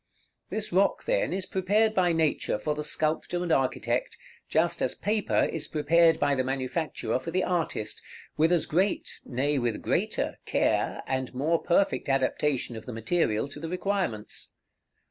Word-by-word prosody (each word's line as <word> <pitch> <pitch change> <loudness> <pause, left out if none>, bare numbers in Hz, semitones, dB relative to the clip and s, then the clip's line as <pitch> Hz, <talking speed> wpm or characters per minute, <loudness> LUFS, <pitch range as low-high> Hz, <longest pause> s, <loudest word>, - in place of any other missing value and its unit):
This 215 -3 -2
rock, 195 +2 +2
then, - - +1
is 190 0 -2
prepared 205 +4 +2
by 180 -4 +3
Nature 160 -8 +1
for 150 +8 -1
the 150 0 -4
sculptor 155 +3 -1
and 175 - -2
architect, 135 -4 0 0.3
just 170 +2 +1
as - - +1
paper 210 0 +1
is 160 - -1
prepared 165 +1 +3
by 145 0 +2
the 130 -2 +1
manufacturer 135 +2 -2
for 150 - -6
the 185 +2 0
artist, 165 -11 -1 0.3
with 160 +3 +3
as 175 -2 +3
great 185 +5 0
nay, 140 +3 0
with 120 -3 -2
greater - - -1
care, - - +1
and 130 -1 -2
more 160 +6 +1
perfect 180 -3 +1
adaptation 135 -1 +1
of 110 - -9
the 125 - -5
material 115 -1 0
to 145 - -8
the 165 +1 -5
requirements. 180 - -2
160 Hz, 160 wpm, -28 LUFS, 135-180 Hz, 0.3 s, by